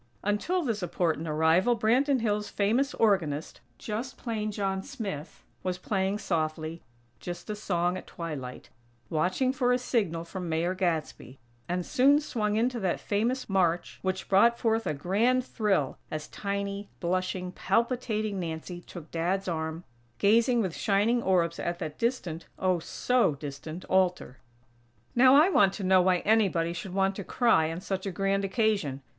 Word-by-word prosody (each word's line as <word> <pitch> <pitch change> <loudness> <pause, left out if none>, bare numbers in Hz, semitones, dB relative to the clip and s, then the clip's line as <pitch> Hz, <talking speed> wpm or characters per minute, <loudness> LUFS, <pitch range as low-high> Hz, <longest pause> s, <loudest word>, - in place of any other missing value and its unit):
Until 215 - 0
this 225 -7 -1
important 165 -2 -1
arrival, 160 +9 +3
Branton 260 +4 +2
Hills' 210 -2 0
famous 235 +8 +1
organist, 170 -9 +1 0.2
just 230 +5 -5
plain 215 -3 -3
John 195 -2 -1
Smith, 190 -7 -6 0.2
was 185 -1 -2
playing 190 +1 -1
softly, 160 -3 -2 0.4
"Just 175 - -6
a - - -3
Song 180 -3 0
at - - -9
Twilight," 150 -7 -6 0.4
watching 185 - +1
for 250 -2 +1
a 250 - +4
signal 200 -10 -1
from 180 0 -6
Mayor 165 +3 0
Gadsby; 165 - -2 0.3
and 180 0 -1
soon 280 +3 +4
swung 215 -8 -1
into 240 +2 +1
that 190 -4 0
famous 235 +5 -1
march 175 -3 0
which 190 0 -2
brought 235 +5 +5
forth 225 -1 0
a 155 - -1
grand 225 - +1
thrill, 195 - 0
as 155 -1 -5
tiny, 200 0 -4
blushing, 185 +1 -1
palpitating 215 0 0
Nancy 170 +1 -5
took 170 -3 -11
"Dad's" 180 +4 -1
arm, 160 0 -3 0.3
gazing 230 +3 +4
with 185 -4 -3
shining 215 +4 +2
orbs 175 -5 +1
at 175 0 -2
that 155 -3 -6
distant 185 -9 -2
oh, 185 -2 +1
so 245 - +1
distant 145 +4 -7
altar. 180 -8 +1 0.8
Now 255 +2 +6
I 310 +6 +7
want 195 - +4
to 205 - -6
know 185 0 +5
why 180 -1 +2
anybody 190 -6 +2
should 180 +1 -6
want 195 0 +2
to 200 - -4
cry 175 -9 +2
on 165 +2 -5
such 190 0 -3
a - - -2
grand 195 +1 0
occasion. 195 - 0
190 Hz, 155 wpm, -28 LUFS, 170-220 Hz, 0.8 s, I